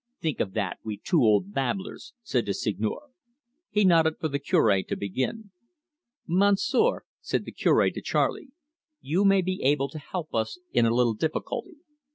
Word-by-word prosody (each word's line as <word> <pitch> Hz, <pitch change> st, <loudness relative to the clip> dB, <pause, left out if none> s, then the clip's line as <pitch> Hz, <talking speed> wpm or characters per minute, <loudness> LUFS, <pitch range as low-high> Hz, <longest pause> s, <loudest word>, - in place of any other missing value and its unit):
"Think 155 Hz, -6 st, -2 dB
of 95 Hz, -, -1 dB
that 100 Hz, -5 st, -2 dB
we 110 Hz, -2 st, -4 dB
two 165 Hz, -, +1 dB
old 115 Hz, -, +3 dB
babblers!" 190 Hz, -, -3 dB
said 125 Hz, -, -1 dB
the 100 Hz, -, -1 dB
Seigneur. 110 Hz, -, -3 dB, 0.6 s
He 210 Hz, -1 st, +2 dB
nodded 165 Hz, -3 st, +4 dB
for 160 Hz, -, -1 dB
the 140 Hz, 0 st, -2 dB
Cure 110 Hz, -, +3 dB
to -, -, -4 dB
begin. 130 Hz, -, -3 dB, 0.8 s
"Monsieur," 200 Hz, -, +2 dB, 0.2 s
said -, -, -2 dB
the -, -, -7 dB
Cure -, -, +3 dB
to -, -, -7 dB
Charley, -, -, 0 dB, 0.5 s
"you 170 Hz, +8 st, 0 dB
maybe 190 Hz, -2 st, +2 dB
able 140 Hz, 0 st, +2 dB
to 155 Hz, -, -8 dB
help 160 Hz, +2 st, -6 dB
us 110 Hz, +6 st, -1 dB
in 120 Hz, -1 st, +3 dB
a 115 Hz, -, +1 dB
little 120 Hz, -2 st, +3 dB
difficulty. 160 Hz, -, -3 dB
155 Hz, 165 wpm, -26 LUFS, 115-190 Hz, 0.8 s, nodded